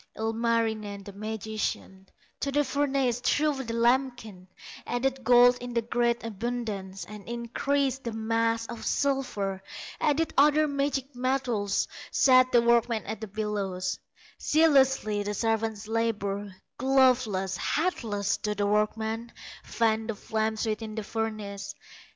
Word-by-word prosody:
Ilmarinen, 220 -2 -1
the 200 - -10
magician, 215 -2 -4 0.3
To 280 - -1
the 290 +1 +2
furnace 270 -3 0
threw 295 +4 +2
the 230 -2 -4
lambkin; 235 -5 0 0.4
Added 265 +2 -1
gold 245 +1 +6
in 245 -1 -6
great 235 +1 +1
abundance, 215 -4 -4
And 210 +1 -10
increased 265 +3 -1
the 235 - -2
mass 225 +1 0
of 230 0 -8
silver, 230 -9 -1 0.4
Added 310 +2 +1
other 300 +2 +5
magic 280 -1 -2
metals, 245 -6 0 0.2
Set 255 -1 +5
the 240 -1 +5
workmen 235 -2 +3
at 220 +1 -5
the 220 - -4
bellows; 195 -3 -3 0.4
Zealously 270 -9 +3
the 205 0 -3
servants 220 -1 -1
labor, 205 -3 -1 0.3
Gloveless, 255 -7 +3
hatless, 220 - -1
do 210 0 -2
the 205 0 0
workmen 220 +2 0 0.3
Fan 225 -1 0
the 225 - -2
flames 220 +1 -2
within 215 0 -3
the 220 - -3
furnace. 210 -2 -4
230 Hz, 120 wpm, -28 LUFS, 210-255 Hz, 0.4 s, gold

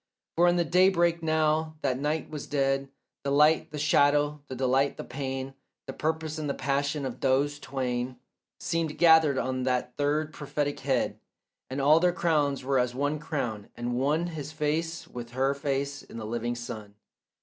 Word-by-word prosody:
For 175 +1 +5
in 175 - +4
the 175 -1 +2
daybreak 175 -2 +3
now 155 0 +1
that 130 0 0
night 150 +2 -1
was 150 -2 -6
dead 135 -1 0 0.3
The 140 - -3
light, 150 +3 +4
the 150 - -7
shadow, 145 0 +3
the 130 - -6
delight, 135 +2 +1
the - - -5
pain, 135 0 -4 0.3
The - - -6
purpose 160 0 -2
and 150 -2 -3
the 140 - -1
passion 140 +1 -1
of 130 - -5
those 140 +2 +1
twain, 125 -2 -3 0.4
Seemed 165 -3 -2
gathered 160 -4 +6
on 130 0 -1
that 125 -1 -1
third 150 +2 0
prophetic 145 0 -2
head, 135 -2 0 0.5
And 130 - -3
all 150 +4 +6
their 175 +1 +3
crowns 150 -6 +1
were 135 0 +2
as 125 0 0
one 145 +3 0
crown, 125 -9 -4
and 120 0 -3
one 145 +7 +1
His 155 -4 -6
face 160 +2 -2
with 120 -1 -8
her 135 +2 +2
face 140 0 -2
in - - -11
the 110 - -5
living 120 +2 -2
sun. 110 -4 -7
145 Hz, 175 wpm, -28 LUFS, 130-155 Hz, 0.5 s, gathered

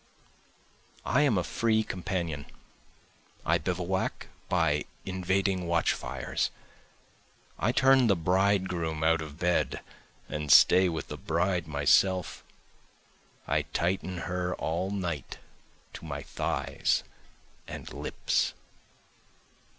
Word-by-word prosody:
I 125 +8 +3
am 140 -9 +3
a 90 - +1
free 110 +2 +1
companion, 85 -7 -3 1.0
I 85 +2 +3
bivouac 90 +3 -2 0.2
by 80 -4 +2 0.2
invading 95 0 0
watchfires, 85 -1 0 1.1
I 110 - +2
turn 130 0 +5
the 100 - +4
bridegroom 90 -3 +1
out 80 0 +3
of 75 -1 -8
bed 90 0 0 0.5
and 75 0 -2
stay 95 0 +7
with 80 -2 -4
the - - -5
bride 85 +1 0
myself, 80 +5 +2 1.0
I - - +2
tighten 90 0 -2
her 90 0 -2
all 85 +4 -2
night 90 -8 -4 0.6
to - - -9
my - - -5
thighs - - -1 0.6
and - - -8
lips. - - -1
90 Hz, 100 wpm, -29 LUFS, 80-95 Hz, 1.1 s, stay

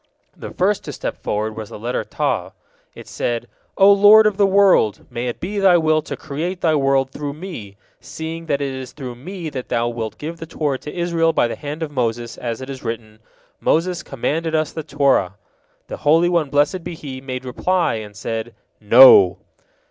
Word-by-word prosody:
The - - -8
first 195 +2 0
to - - -5
step - - -6
forward 110 +1 -2
was 110 -2 -7
the - - -9
letter 120 +4 -3
Taw. - - -2 0.4
It - - -12
said: 120 0 -3 0.3
"O 195 +1 +7
Lord 205 +2 +7
of 215 -2 +2
the 200 0 +3
world! 195 - +3
May 120 +1 -3
it 120 - -4
be 200 +3 -3
Thy 190 -3 +5
will 155 -1 +2
to - - -7
create 165 +5 -5
Thy 160 -2 +2
world 135 -2 +1
through 145 0 -5
me, 150 - -9 0.2
seeing 165 +1 -7
that 145 -2 0
it 140 -1 -2
is 130 -1 -8
through 130 -4 -7
me 165 +6 -7
that 130 -3 -6
Thou 120 0 0
wilt 115 -2 -5
give 165 +3 -6
the 165 - -8
Torah 145 -4 -2
to 150 - -8
Israel 170 -1 +1
by - - +2
the 115 - -5
hand 150 +2 -6
of 155 - -5
Moses, 120 -3 -2
as 120 0 -4
it 130 - -8
is 130 - -8
written, 110 -2 -6 0.4
'Moses 175 +2 0
commanded 160 +5 -2
us 155 -1 0
the 160 - -5
Torah.'" 135 -11 +1 0.5
The - - -7
Holy 165 +4 +3
One, 170 -5 +1
blessed 145 +6 +1
be 170 - -6
He, 135 -4 -8
made 130 -1 -6
reply, 180 +8 0
and 105 -2 -7
said, 115 +2 -5 0.2
"No!" 105 -4 +7
145 Hz, 200 wpm, -20 LUFS, 120-165 Hz, 0.5 s, O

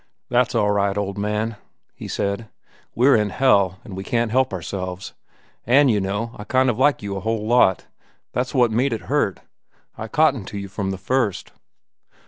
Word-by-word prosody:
"That's 125 0 +2
all 105 -2 +2
right, 100 -1 +1
old 100 0 -3
man," 105 +2 -2 0.4
he - - -9
said. 100 +2 -3 0.5
"We're 130 +4 +5
in 105 -2 +1
hell, 100 -6 +2
an' 100 - -9
we 95 +1 -5
can't 115 +1 0
help 130 +2 +2
ourselves. 95 0 -5 0.5
An', 135 +3 +5
you 105 -3 +2
know, 100 +4 -2
I - - -5
kind 130 +3 +2
of 120 - -6
like 145 -4 +3
you 100 -1 -4
a - - -3
whole 110 0 -2
lot. 110 -5 +3 0.5
That's 125 +2 -2
what 120 -3 +4
made 125 +4 +1
it—hurt. 110 - -1 0.5
I 110 - -6
cottoned 140 -7 +2
to 100 - -6
you 100 -1 -6
from 95 0 -3
the 95 - -3
first." 120 -1 -1
110 Hz, 180 wpm, -22 LUFS, 100-125 Hz, 0.5 s, We're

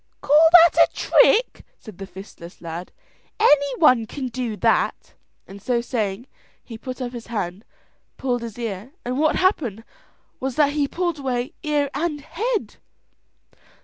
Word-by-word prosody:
"Call 305 +3 +5
that 340 - +5
a - - -35
trick," - - +3
said 215 -5 -13
the 195 - -7
fistless 185 -2 -12
lad, 170 +1 -7 0.5
"any 285 - +4
one 255 -8 +4
can 260 0 -5
do 240 -3 -4
that," - - 0 0.3
and 200 +1 -12
so 240 +3 0
saying, 225 -2 -3 0.4
he 230 - -10
put 255 +3 -7
up 250 -2 -4
his 240 -2 -9
hand, 200 -3 -4 0.5
pulled 245 -2 -1
his 230 -2 -7
ear, 225 +2 -6
and 250 +2 -2
what 310 0 +2
happened 260 - 0 0.6
was 265 -1 -3
that 290 -2 +3
he 290 -2 0
pulled 345 0 -2
away 260 +2 -3
ear 295 -3 0
and 310 -3 -2
head. 430 - -3
255 Hz, 150 wpm, -22 LUFS, 220-295 Hz, 0.6 s, Call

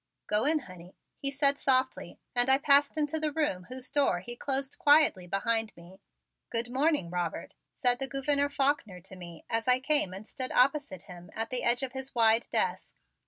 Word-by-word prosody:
"Go 210 +3 0
in, 305 +1 +1
honey," 185 -5 -14 0.2
he 275 - -2
said 280 0 +2
softly 260 -1 0 0.2
and 245 +1 +2
I 265 - +5
passed 285 +1 +3
into 305 +1 -1
the 305 -1 0
room 285 -13 -2
whose 255 +2 -8
door 280 -11 +1
he 240 +5 -6
closed 270 +1 -3
quietly 290 - +4
behind 225 +3 -1
me. 180 +3 -16 0.5
"Good 235 +1 -2
morning, 275 - 0
Robert," 175 -2 -4 0.2
said 245 -2 +1
the 270 - -2
Gouverneur 280 +2 +1
Faulkner 275 -9 -1
to 190 +2 -10
me 170 -3 -12
as 225 +2 -2
I 250 0 +4
came 285 -7 +3
and 195 +3 -9
stood 255 +3 -3
opposite 270 - +1
him 175 0 -13
at 225 +2 -3
the 255 - -1
edge 245 +2 +2
of 255 -1 -5
his 265 0 -7
wide 225 0 +4
desk. - - -1
255 Hz, 190 wpm, -29 LUFS, 200-280 Hz, 0.5 s, I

